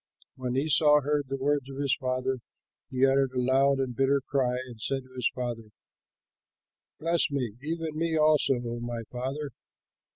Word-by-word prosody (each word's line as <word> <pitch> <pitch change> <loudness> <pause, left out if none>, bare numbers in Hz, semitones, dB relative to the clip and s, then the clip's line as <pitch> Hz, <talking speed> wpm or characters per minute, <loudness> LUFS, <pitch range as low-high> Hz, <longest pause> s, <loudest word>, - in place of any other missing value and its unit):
When 130 -1 -3
Esau 150 +1 +5
heard 145 0 0
the 135 +1 -3
words 140 0 0
of 135 - -8
his 140 -2 +1
father, 130 0 -1 0.5
he 130 +1 +3
uttered 135 -1 +2
a 125 - -1
loud 135 +2 +3
and 130 -2 -2
bitter 135 +2 +3
cry 130 -2 0
and 120 -4 -11
said 135 +3 -1
to 130 0 -19
his 125 -2 0
father, 120 -3 -4 1.3
"Bless 165 +1 +2
me, 130 -7 -2
even 160 +1 -3
me 165 0 0
also, 155 -3 +4
O 120 -1 -4
my 120 -1 -4
father." 135 +4 -4
135 Hz, 165 wpm, -28 LUFS, 125-145 Hz, 1.3 s, Esau